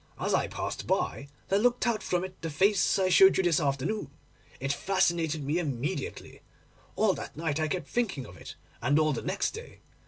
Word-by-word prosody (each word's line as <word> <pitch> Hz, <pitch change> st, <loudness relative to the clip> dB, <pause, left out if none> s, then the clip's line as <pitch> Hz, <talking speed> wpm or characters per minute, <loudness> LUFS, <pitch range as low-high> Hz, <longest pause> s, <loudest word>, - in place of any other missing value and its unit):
As -, -, -1 dB
I -, -, +2 dB
passed -, -, -5 dB
by 140 Hz, -, -1 dB, 0.2 s
there 195 Hz, -, +3 dB
looked 245 Hz, +3 st, +2 dB
out 235 Hz, -3 st, +1 dB
from 180 Hz, 0 st, -1 dB
it 185 Hz, 0 st, -8 dB
the 165 Hz, -, -3 dB
face 190 Hz, +6 st, +3 dB
I 190 Hz, -1 st, +2 dB
showed 190 Hz, +1 st, +7 dB
you 190 Hz, -, +2 dB
this 170 Hz, -4 st, +3 dB
afternoon. 145 Hz, +9 st, -1 dB, 0.5 s
It 135 Hz, +2 st, -1 dB
fascinated 165 Hz, -3 st, 0 dB
me 150 Hz, +5 st, 0 dB
immediately. 150 Hz, -, -4 dB, 0.5 s
All 215 Hz, -3 st, +3 dB
that -, -, -8 dB
night 160 Hz, -2 st, -1 dB
I 155 Hz, -, +1 dB
kept 175 Hz, -3 st, -3 dB
thinking 190 Hz, -, -1 dB
of 90 Hz, -, -12 dB
it, -, -, -10 dB, 0.3 s
and 140 Hz, +5 st, +2 dB
all 155 Hz, -1 st, +3 dB
the 120 Hz, -, -3 dB
next -, -, -1 dB
day. -, -, -10 dB
165 Hz, 195 wpm, -29 LUFS, 145-195 Hz, 0.5 s, showed